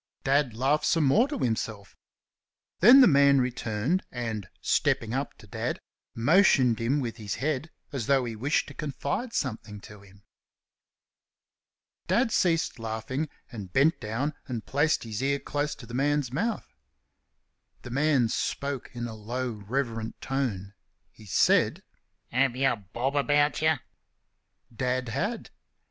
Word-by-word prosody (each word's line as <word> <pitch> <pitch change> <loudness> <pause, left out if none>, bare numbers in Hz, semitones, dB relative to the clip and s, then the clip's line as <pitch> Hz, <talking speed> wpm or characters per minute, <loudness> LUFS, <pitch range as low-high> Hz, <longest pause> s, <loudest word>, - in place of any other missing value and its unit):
Dad 135 -4 +2
laughed 135 +6 +1
some 165 - +3
more 205 - +4
to 285 0 -4
himself. 110 - -3 0.8
Then 245 +8 +9
the 255 - +8
man 140 -3 +5
returned 125 - -1
and, 110 -6 -4
stepping 115 +1 +1
up 135 +2 -3
to - - -15
Dad, 105 - -3 0.4
motioned 130 - +4
him 125 +6 +1
with 115 -2 -4
his 105 -3 -4
head 150 +2 -2 0.2
as 125 -6 -3
though 135 -2 +3
he 115 -2 -5
wished 135 +8 0
to - - -10
confide 150 - -3
something 110 - -4
to 105 +1 -12
him. 100 0 -19 1.8
Dad 225 +6 +2
ceased 165 - +1
laughing 115 +7 -3 0.2
and 100 -7 -8
bent 145 +5 +3
down 120 +8 -2
and 120 -4 -5
placed 150 +3 +1
his 110 -1 -5
ear 140 +1 +1
close 145 +1 -3
to 120 - -12
the 115 - -11
man's 140 -1 0
mouth. 220 - -2 1.1
The 120 - -8
man 140 -2 +2
spoke 140 +3 -3
in 120 0 -3
a 115 - -6
low, 120 +4 -4
reverent 115 +1 -3
tone. 110 -8 -3 0.4
He 110 - -16
said: - - +3 0.5
"Have 130 0 +2
y'a 135 -1 +2
bob 120 +7 -4
about 145 +1 +2
y'?" 160 0 +4 1.0
Dad 125 +1 -1
had. 200 - -3
130 Hz, 140 wpm, -27 LUFS, 115-145 Hz, 1.8 s, Then